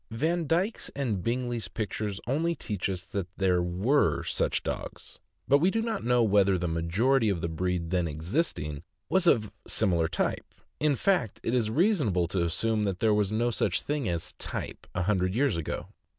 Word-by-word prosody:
Vandyke's 165 - 0
and 120 -9 -1
Bingley's 120 -2 -2
pictures 105 -1 -3
only 160 +7 0
teach 105 - -3
us 90 -1 -4
that 100 -3 -3
there 90 -2 +2
were 95 +12 +2
such - - -1
dogs, - - -6 0.3
but 140 +1 +5
we 175 +5 +4
do 225 - 0
not 225 -2 -2
know 125 0 +3
whether 100 -3 +4
the 90 0 -2
majority 105 +10 +2
of 95 -4 0
the 85 - -2
breed 85 0 -2
then 90 -2 +1
existing 80 - -2 0.3
was 185 -1 +2
of 110 -9 +3 0.2
similar 85 -3 +2
type; - - -2 0.2
in 150 -2 +3
fact, 175 - +1
it 115 - -1
is 120 -4 +2
reasonable 130 - +2
to 90 -2 0
assume 110 +6 0
that 95 -3 -1
there 110 -1 +3
was 105 -1 +1
no 120 +3 +1
such 100 -4 0
thing 145 -6 -1
as 85 -2 -3
"type" - - -5
a 90 - 0
hun 100 +1 +2
dred 90 +2 0
years 140 -1 +2
ago. 85 -2 -4
105 Hz, 180 wpm, -28 LUFS, 90-135 Hz, 0.3 s, but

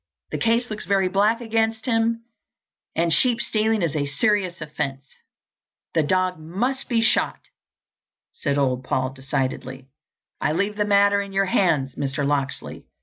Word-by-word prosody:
The - - -3
case 230 +1 +1
looks 215 - -5
very 195 -1 +3
black 205 +5 +2
against 225 -1 0
him, 230 -1 +1 0.7
and 165 0 +2
sheep 245 -2 +4
stealing 220 -3 +1
is 160 -2 -1
a 145 -2 0
serious 185 +2 0
offence." 145 -3 -4 0.9
"The 165 - +3
dog 185 +3 +1
must 235 +12 -2
be 230 -2 +2
shot," - - +1 0.9
said 140 -2 -1
old 130 -2 +1
Paul 130 0 -1
decidedly. 130 -1 -3 0.5
"I 150 - +1
leave 200 +5 0
the 210 0 0
matter 200 0 +4
in 200 -1 -7
your 195 0 +2
hands, 160 -9 +1
Mr. 140 +1 -2
Locksley. 140 -1 -2
185 Hz, 145 wpm, -23 LUFS, 145-220 Hz, 0.9 s, sheep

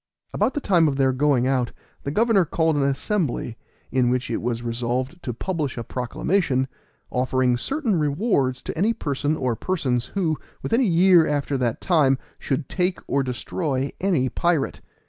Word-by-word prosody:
About - - +1
the - - +1
time 175 - +3
of 140 - 0
their 135 -1 +2
going 130 -2 +2
out 130 -2 0 0.3
the - - -4
governor 215 +3 +3
called 160 -1 +1
an 145 - +1
assembly, 140 - -1 0.4
in 125 -2 +2
which 125 -1 -1
it - - -1
was 120 0 -2
resolved 125 +7 -2
to 125 - -3
publish 150 - -3
a 120 - -3
proclamation, 130 - 0 0.4
offering 130 0 +1
certain 255 - -1
rewards 145 - +1
to - - -5
any 205 +8 +2
person 145 -4 -1
or 125 -5 0
persons 130 -6 -1
who, 165 -6 0 0.2
within 230 +3 +2
a - - +4
year 180 -4 +5
after 145 -1 -1
that 120 -4 -1
time, 150 -7 +3 0.2
should 135 +1 -2
take 180 0 0
or 140 - +1
destroy 135 +2 -2
any 175 -9 +2
pirate. 165 0 0
140 Hz, 165 wpm, -23 LUFS, 130-175 Hz, 0.4 s, year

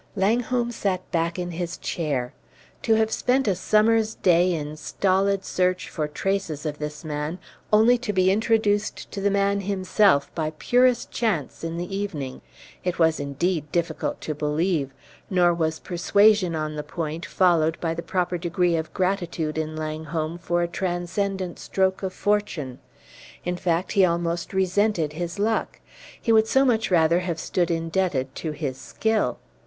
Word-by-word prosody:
Langholm 240 +4 +1
sat 190 -5 -2
back 170 -1 0
in 175 -1 -3
his 175 +1 -4
chair. 140 -7 -2 0.5
To 225 - +3
have 220 0 +2
spent 260 +2 +1
a 200 - +4
summer's 215 +4 +2
day 180 0 +3
in 150 -3 -3
stolid 195 +4 0
search 185 0 0
for 155 -2 -2
traces 165 -1 -2
of 150 -1 -3
this 150 +1 -6
man, 150 +2 -3 0.3
only 225 +3 +5
to 235 -3 -2
be 185 -1 +3
introduced 215 -1 +1
to 200 - -5
the 200 - +2
man 200 0 +1
himself 195 -4 +2
by 155 -1 -2
purest 245 +3 +2
chance 200 - -1
in 165 0 -3
the 180 +3 -4
evening! 155 -10 -4 0.4
It 180 -1 -1
was, 160 -1 +3
indeed, 150 +3 -2
difficult 170 -2 -1
to 155 - -3
believe; 150 0 0 0.4
nor 175 -2 +4
was 160 -1 -1
persuasion 200 0 +3
on 155 -1 -3
the - - -1
point 160 +1 -5
followed 165 -3 +2
by 165 -1 -1
the 165 - -4
proper 180 +1 -1
degree 175 0 +1
of 160 -1 -3
gratitude 175 -4 -1
in 155 0 -3
Langholm 155 +1 -3
for 175 0 0
a - - 0
transcendent 185 +1 -2
stroke 190 -1 0
of 190 -1 -2
fortune. 185 -12 -1 0.7
In 180 0 -1
fact, 175 0 -1
he 200 -2 +4
almost 170 -1 0
resented 190 -4 +1
his 175 +3 -4
luck; 220 +2 -1 0.4
he 230 - 0
would 220 0 +5
so 265 +4 +4
much 225 -3 +2
rather 170 -1 +4
have 175 -3 -3
stood 175 +1 0
indebted 165 -5 -1
to 160 - -4
his 145 -4 -4
skill. 220 +10 0
175 Hz, 160 wpm, -24 LUFS, 160-200 Hz, 0.7 s, only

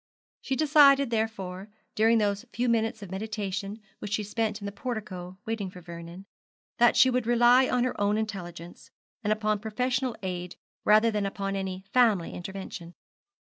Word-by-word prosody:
She 270 - -2
decided, 280 -3 +5
therefore, 205 -4 -3 0.2
during 225 +2 +4
those 205 -1 0
few 245 +1 -1
minutes 225 -1 0
of 190 - -9
meditation 200 0 -4 0.2
which 205 - -6
she 215 - 0
spent 215 0 -2
in 200 - -8
the 200 - -3
portico 200 -6 -6
waiting 220 -4 -3
for 180 - -11
Vernon, 170 +2 -10 0.5
that 240 0 +5
she 260 - +6
would 250 -2 0
rely 240 +2 +5
on 250 -1 +2
her 250 -4 -2
own 205 +1 +2
intelligence, 175 -5 -6 0.3
and 210 - 0
upon 215 -1 +1
professional 250 +3 -1
aid 180 -1 -4 0.3
rather 215 +2 +5
than 210 -2 -1
upon 195 0 -3
any 190 -1 -4
family 225 -9 +3
intervention. 180 -2 -7
210 Hz, 160 wpm, -28 LUFS, 190-235 Hz, 0.5 s, she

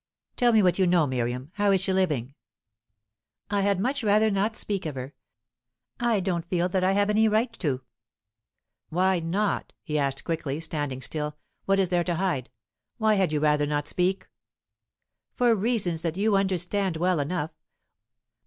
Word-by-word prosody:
"Tell 245 -1 +3
me 220 -2 +4
what 180 +1 +2
you 185 - +4
know, 175 -3 +4
Miriam. 125 +1 -3
How 205 -1 +3
is 190 -2 +3
she 190 0 +1
living?" 150 -9 0 1.2
"I 200 -1 +2
had 200 -1 +1
much 260 +5 -1
rather 215 +1 +3
not 205 +3 0
speak 200 -6 -3
of 150 - -5
her. 130 +2 -6 0.9
I 235 -3 +2
don't 175 -3 -2
feel 175 -1 +1
that 185 0 0
I 190 +1 +3
have 205 +1 +2
any 220 +1 +4
right 220 +3 +1
to." 135 -7 -1 1.1
"Why 185 +2 +2
not?" 195 +5 -1
he 150 -2 -1
asked 140 -1 -1
quickly, 155 -3 -3
standing 145 -5 -4
still. 150 -1 -3 0.3
"What 195 0 +2
is 190 -2 +2
there 175 -1 +2
to 175 - 0
hide? 165 -8 -1 0.5
Why 220 -1 +3
had 190 -6 +2
you 150 - +1
rather 150 -1 +2
not 145 0 -1
speak?" 185 +3 -1 1.1
"For 245 -2 +4
reasons 200 -6 +1
that 165 0 -3
you 210 +1 +2
understand 190 -1 0
well 180 0 +1
enough. 155 +2 -2
180 Hz, 170 wpm, -26 LUFS, 155-200 Hz, 1.2 s, me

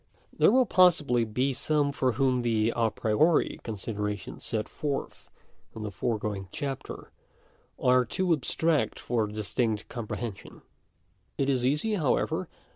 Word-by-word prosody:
§ - - -38
I - - -30
There - - +6
will 255 +2 +5
possibly 150 - +4
be 125 +5 0
some 145 +2 +1
for 130 -3 0
whom 130 0 +2
the 115 -1 +1
a 115 -1 +2
priori 130 +11 +2
consider* 105 -1 -5
ations 105 -1 -4
set 110 -2 -2
forth 145 -2 -4 0.5
in 110 - -6
the 105 - -4
foregoing 105 -1 -2
chapter, 140 -4 -5 0.7
are 125 0 +4
too 175 +9 0
abstract 150 -3 0
for 115 -3 0
distinct 105 +1 -2
comprehension. 115 -2 -6 0.7
It 135 0 +1
is 130 -3 +1
easy, 150 - +1
however 155 -10 0
125 Hz, 140 wpm, -28 LUFS, 110-145 Hz, 0.7 s, There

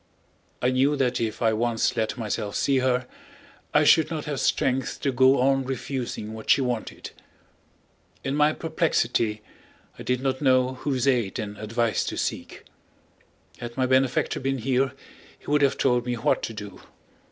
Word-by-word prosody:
I 125 - +3
knew 135 +3 +2
that 125 -3 0
if 115 +1 -2
I 110 -1 +3
once 115 +2 0
let 110 +1 -1
myself 105 -2 -3
see 135 -2 +2
her 130 0 +1 0.7
I - - +4
should 155 -1 +5
not 160 -3 -4
have 145 -3 -3
strength 130 -1 0
to 140 - +1
go 130 +1 +4
on 135 +1 +3
refusing 125 -4 -4
what 110 -1 -9
she - - +6
wanted. 125 -4 -3 1.1
In 135 - -2
my 150 +1 +4
perplexity 115 -10 0 0.6
I - - -7
did 125 0 0
not 130 0 -1
know 130 -2 +3
whose 130 -1 -2
aid 120 -7 +1
and 105 -3 -5
advice 110 +2 -1
to - - -4
seek. - - -4 1.0
Had 120 0 -7
my 130 - +2
benefactor 130 0 +1
been 135 0 -1
here 130 +2 0 0.4
he - - -24
would 150 0 +3
have 140 -2 +3
told 125 0 +1
me 125 - 0
what 115 - +1
to 115 - -4
do. 105 -2 -9
125 Hz, 165 wpm, -25 LUFS, 115-135 Hz, 1.1 s, she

